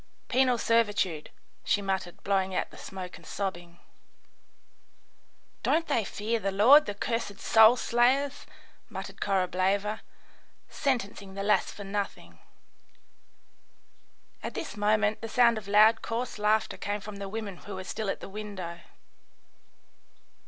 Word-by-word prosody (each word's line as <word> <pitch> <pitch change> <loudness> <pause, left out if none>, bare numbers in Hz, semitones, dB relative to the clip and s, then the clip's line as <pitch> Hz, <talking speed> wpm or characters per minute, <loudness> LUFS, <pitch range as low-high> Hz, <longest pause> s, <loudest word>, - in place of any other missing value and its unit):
"Penal 255 -1 +3
servitude," 205 -9 +1 0.3
she - - +2
muttered, 190 -3 -3
blowing 190 -1 0
out - - -1
the - - -14
smoke 185 -2 -8
and - - -18
sobbing. 175 -3 -5 1.8
"Don't 330 +1 +2
they 230 - +1
fear 215 +4 -2
the 195 -1 -1
Lord, 245 +10 +7
the 205 - -3
cursed 230 -3 -3
soul 220 +2 +6
slayers?" 260 +4 +1 0.4
muttered - - -8
Korableva, 195 +2 0 0.7
"sentencing 205 -8 -2
the 195 - -3
lass 205 -2 +2
for 205 - -9
nothing." 200 0 -5 2.0
At - - -6
this - - -5
moment 210 0 +1
the 225 - -5
sound 235 -1 +4
of 200 - -14
loud, 215 +2 +5
coarse 230 -1 -4
laughter 215 +1 +1
came 205 +1 -3
from 205 0 -9
the 200 -1 -6
women 205 -3 -5
who 200 +1 -9
were 190 - -6
still 210 +2 -4
at - - -3
the - - -7
window. 195 -4 -7
205 Hz, 130 wpm, -28 LUFS, 195-225 Hz, 2.0 s, Lord